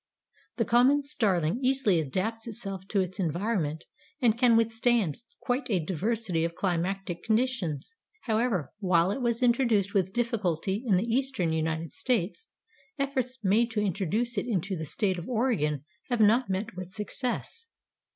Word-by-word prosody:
The - - 0
common 260 +5 +4
Starling 200 - +1
easily 255 -9 +3
adapts 205 - -2
itself 195 -4 -6
to 200 -1 +1
its 185 +2 -4
environment 170 -3 -1 0.3
and 235 -4 +3
can 235 -1 +5
withstand 225 - +2 0.2
quite 250 0 -1
a 195 -5 +2
diversity 190 0 -1
of 170 0 -2
climatic 180 0 -2
conditions. 225 - -1 0.3
However, 220 - 0
while 180 -2 +3
it 265 - -3
was 235 0 0
introduced 235 -5 +2
with 190 -2 +1
difficulty 205 -3 -1
in 200 - +4
the 185 +5 +1
eastern 235 -9 0
United 160 0 -2
States, 240 - -1 0.5
efforts 265 -2 -1
made 215 +5 +3
to 225 -2 -2
introduce 205 +4 0
it 200 - -5
into 195 -3 -1
the 160 -2 -4
State 190 +2 0
of 170 - -8
Oregon 205 - 0 0.2
have 245 -2 0
not 220 +3 +4
met 195 +2 -2
with 185 -1 -6
success. 245 - -4
210 Hz, 150 wpm, -28 LUFS, 180-240 Hz, 0.5 s, can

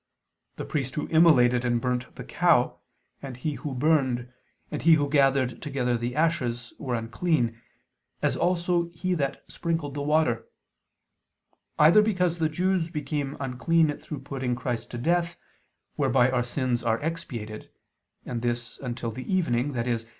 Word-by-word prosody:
The - - -5
priest 135 -3 -3
who 150 - -2
immolated 130 -7 +5
and 120 -1 +1
burned 125 +1 -1
the - - -7
cow, - - +2 0.4
and 135 -3 -7
he 150 +4 -2
who 140 -2 -5
burned, 130 -4 +1 0.4
and 150 - -3
he 165 0 +6
who 145 -2 +1
gathered 135 -3 +2
together 130 -4 -1
the 120 +2 -3
ashes, 125 -7 0
were 125 -3 -2
unclean, 115 0 -1 0.6
as - - +1
also 175 -1 +1
he 185 +2 -1
that 140 -5 -2
sprinkled 165 -4 -3
the 145 - -4
water: 150 -6 +1 1.3
either 160 +8 +7
because 180 -5 +1
the 160 -1 +2
Jews 180 +1 0
became 150 -3 -3
unclean 150 +4 +1
through 150 -4 -7
putting 135 -3 -3
Christ 120 -2 -3
to 120 - -6
death, 170 +6 0 0.6
whereby 125 +1 +3
our 125 -1 +1
sins 125 -1 -1
are 115 -1 +1
expiated; 120 -10 -5 0.6
and 120 -2 -4
this, 120 -1 -3
until 120 -3 -4
the 130 - -7
evening, 140 -7 +1
i.e. 120 0 0
135 Hz, 150 wpm, -26 LUFS, 120-160 Hz, 1.3 s, either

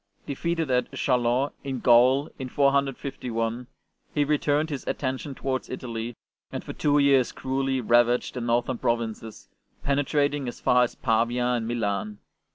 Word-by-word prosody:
Defeated 165 +1 -2
at 125 0 +1
Chalons 125 +1 +1
in 135 -2 -3
Gaul 125 +4 +4
in 130 -1 -5
451, 125 -4 0 0.5
he 150 0 +2
turned 150 +2 +1
his 140 -3 -4
attention 135 +1 -3
towards 130 -1 -3
Italy, 120 -2 -5 0.4
and - - -5
for - - -7
two 145 -1 +2
years 140 -3 +4
cruelly 135 0 -1
ravaged 120 +1 +3
the 125 - -4
northern 120 +1 0
provinces, 115 -2 -3 0.4
pene 140 0 +2
trating 145 -1 0
as 120 - -6
far 125 0 +4
as - - -8
Pavia 120 +1 +1
and 120 -2 0
Milan. 105 -3 -2
125 Hz, 145 wpm, -26 LUFS, 120-140 Hz, 0.5 s, Gaul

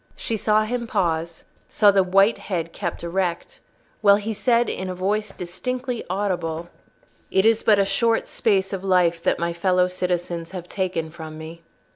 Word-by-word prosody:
She 225 - -3
saw 215 +1 +2
him 235 +2 -3
pause, 170 -5 -1 0.3
saw 205 -2 +5
the 195 -1 +4
white 195 +4 +3
head 170 -4 -4
kept 175 -4 -4
erect, 175 0 -2 0.4
while 200 -2 +7
he 210 +2 -3
said, 235 +2 +2
in 190 0 -3
a 185 - -4
voice 205 +3 -1
distinctly 245 +8 -4
audible— 175 -4 -2 0.6
"It 190 +2 +2
is 225 0 +4
but 210 -2 +4
a 200 - +3
short 225 +4 +1
space 195 -3 0
of 190 -1 -4
life 180 -3 +2
that - - +1
my 170 0 -1
fellow 180 +1 +2
citizens 175 -2 -3
have 180 -2 -6
taken 180 -5 -2
from 155 -1 -9
me." 160 +1 -9
185 Hz, 170 wpm, -23 LUFS, 170-210 Hz, 0.6 s, while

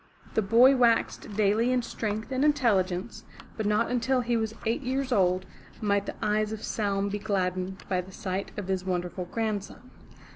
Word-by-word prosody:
The 220 - +2
boy 235 +6 +6
waxed 235 -4 +2
daily 215 +4 +3
in 250 -1 +1
strength 220 +1 -4
and 260 +1 +1
intelligence, 215 -9 +1 0.3
but 215 -2 -2
not 215 +3 +2
until 250 +1 +1
he 240 0 0
was 220 -1 -1
eight 230 +6 0
years 265 0 -2
old, 185 -4 +2 0.3
might 200 -2 +1
the - - -4
eyes 210 0 +1
of 220 -1 -6
Saum 200 -2 -1
be 205 +1 -3
gladdened 190 -2 -2
by 185 -1 0
the 185 +2 -13
sight 190 +1 -4
of 205 -3 -4
his 190 -1 -1
wonderful 180 0 -2
grandson. 220 +4 -4
210 Hz, 175 wpm, -28 LUFS, 190-235 Hz, 0.3 s, boy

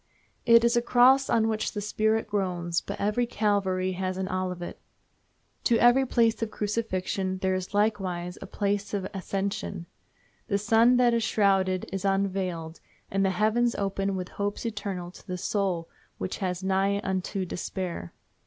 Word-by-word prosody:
It 230 0 +7
is 235 0 +3
a 240 - +4
cross 255 +3 +5
on 225 -1 +3
which 220 -1 -1
the 210 - -3
spirit 220 +2 +1
groans, 180 -5 -1
but - - -6
every 210 +4 +1
Calvary 195 -4 0
has 185 0 -3
an 190 0 -2
Olivet. 180 -2 -3 0.9
To 235 - +4
every 245 +3 +5
place 230 -2 +2
of 225 - -1
crucifixion 195 -3 -2
there 190 0 +2
is 185 +2 -4
likewise 190 -4 0
a 195 - -7
place 200 +1 -1
of 190 -2 -2
ascension. 195 -2 -3 0.6
The 200 - +1
sun 225 +4 +4
that 245 -1 +4
is 230 - +2
shrouded 195 -4 +2
is 195 -1 -3
unveiled, 190 -4 -1 0.3
and 195 0 +1
the 195 - +3
heavens 220 +5 +2
open 195 0 -1
with 185 -1 -4
hopes 205 +3 -3
eternal 200 -5 -4
to - - -16
the 180 - -3
soul 180 -3 -1 0.3
which 185 - -4
was 185 -1 -2
nigh 195 +1 +1
unto 190 0 -2
despair. 175 - -5
195 Hz, 160 wpm, -27 LUFS, 185-220 Hz, 0.9 s, It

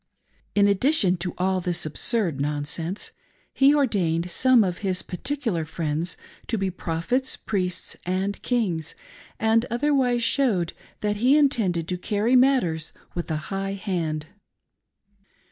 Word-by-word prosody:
In 205 -1 +5
addition 200 - +3
to 175 0 -4
all 185 0 +1
this 175 -1 +1
absurd 165 - -1
nonsense, 150 +6 -2 0.4
he 275 +2 +5
ordained 180 - +1
some 255 0 +5
of 180 -2 -2
his 190 -2 0
particular 225 - -2
friends 155 +1 -2 0.3
to 225 - -1
be 195 -2 -1
prophets, 180 +10 -1
priests, 185 -4 -2
and 190 +3 -2
kings, 180 - -1 0.4
and 225 +1 +2
otherwise 250 -1 +1
showed 225 -11 +2 0.3
that 210 0 0
he 255 +7 +4
intended 210 - +2
to 180 0 -3
carry 215 +6 +1
matters 245 - +2 0.2
with 175 -1 -4
a 160 - 0 0.2
high 195 0 -3
haiid. 165 -6 -2
195 Hz, 130 wpm, -24 LUFS, 170-240 Hz, 0.4 s, In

